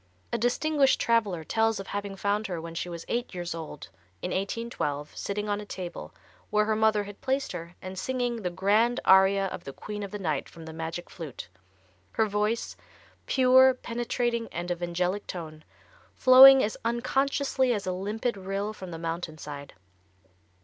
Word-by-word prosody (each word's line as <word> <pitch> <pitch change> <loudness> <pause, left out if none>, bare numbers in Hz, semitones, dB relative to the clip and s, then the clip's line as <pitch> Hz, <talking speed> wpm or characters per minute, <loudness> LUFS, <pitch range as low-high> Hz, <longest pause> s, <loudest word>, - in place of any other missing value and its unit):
A - - +2
distinguished 275 +4 +2
traveler 210 -8 +1
tells 225 +4 +1
of 195 - -6
having 200 0 -4
found 205 +2 -1
her 180 -3 -4
when 165 0 -7
she 175 +1 -4
was 170 -1 -7
eight 240 -4 -2
years 175 -1 -4
old, 160 -6 -8 0.3
in - - -2
1812, 190 -8 -3
sitting 205 +1 -3
on 205 0 -1
a - - -7
table, 180 -3 -7 0.4
where 210 0 +2
her 215 0 +1
mother 215 -1 +3
had 205 0 -11
placed 265 +1 -1
her, 170 0 -7
and 185 0 -6
singing 245 +1 -1
the 190 -5 -2
grand 215 +7 +2
aria 190 +1 +6
of - - -7
the 135 - -7
Queen 210 +6 -7
of 200 - -4
the 210 - -5
Night 155 -8 -2
from 165 -1 -12
the 160 - -8
"Magic 165 +2 -5
Flute," 160 -7 -8 0.7
her 220 - +2
voice, 210 +2 -1 0.5
"pure, 260 0 +6
penetrating 240 -1 -2
and 175 +1 -4
of 175 0 -3
angelic 180 +3 -1
tone," 155 -3 -7 0.5
flowing 265 +1 +9
as 210 - -1
"unconsciously 260 +2 +1
as 205 -4 -1
a 185 - -1
limpid 210 +6 -2
rill 195 +2 -3
from 190 -3 -9
the 165 - -6
mountain 165 -1 -4
side." 145 -2 -8
205 Hz, 175 wpm, -28 LUFS, 175-235 Hz, 0.7 s, flowing